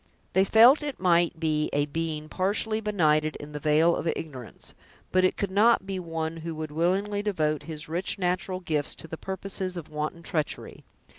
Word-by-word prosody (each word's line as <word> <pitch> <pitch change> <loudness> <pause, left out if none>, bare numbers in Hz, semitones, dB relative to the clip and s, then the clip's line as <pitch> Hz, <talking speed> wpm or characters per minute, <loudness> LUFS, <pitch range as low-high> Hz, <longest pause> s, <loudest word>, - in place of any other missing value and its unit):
They 190 +1 +4
felt 235 +9 +7
it 290 -3 -4
might 175 -2 +3
be 155 -2 0
a 145 0 +2
being 155 0 -3
partially 210 +5 0
benighted 155 -7 +2
in 145 +1 -9
the 150 - -5
vale 155 +3 +3
of 170 - -3
ignorance, 130 -7 -8 0.4
but 185 0 +3
it 185 - +2
could 200 -2 -2
not 210 +1 +4
be 190 -1 -3
one 165 -2 -4
who 165 0 -5
would 155 -1 -5
willingly 190 +6 0
devote 155 -8 0
his 155 0 -5
rich 175 +6 -2
natural 185 0 -1
gifts 150 -5 -1
to - - -8
the 160 - -6
purposes 190 0 -4
of 165 - -7
wanton 155 +2 -4
treachery. 155 -2 -3
170 Hz, 180 wpm, -27 LUFS, 155-190 Hz, 0.4 s, felt